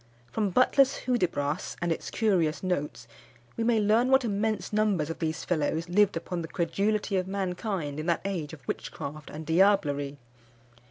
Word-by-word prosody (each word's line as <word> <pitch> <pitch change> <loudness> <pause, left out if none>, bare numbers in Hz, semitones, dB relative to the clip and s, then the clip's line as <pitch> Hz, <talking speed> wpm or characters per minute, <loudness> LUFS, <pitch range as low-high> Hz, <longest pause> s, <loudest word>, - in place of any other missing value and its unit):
From 205 - 0
Butler's 260 +6 +3
Hudibras, 175 - -1
and 175 -1 -1
its 165 - -3
curious 175 -9 +1
notes, 145 -10 -2 0.5
we 230 - -1
may 230 -1 +3
learn 220 +4 +3
what 265 -1 +4
immense 210 -2 -1
numbers 200 -8 +1
of - - -7
these 160 -1 -2
fellows 160 0 0
lived 200 0 +3
upon 175 +1 -4
the 165 - -5
credulity 200 +4 0
of 185 0 -1
mankind 185 -5 -3
in 155 - -4
that 170 - +1
age 175 -7 -3
of 145 -6 -12
witchcraft 150 +1 -5
and 155 +1 -7
diablerie. 160 -5 +2
180 Hz, 160 wpm, -28 LUFS, 155-210 Hz, 0.5 s, what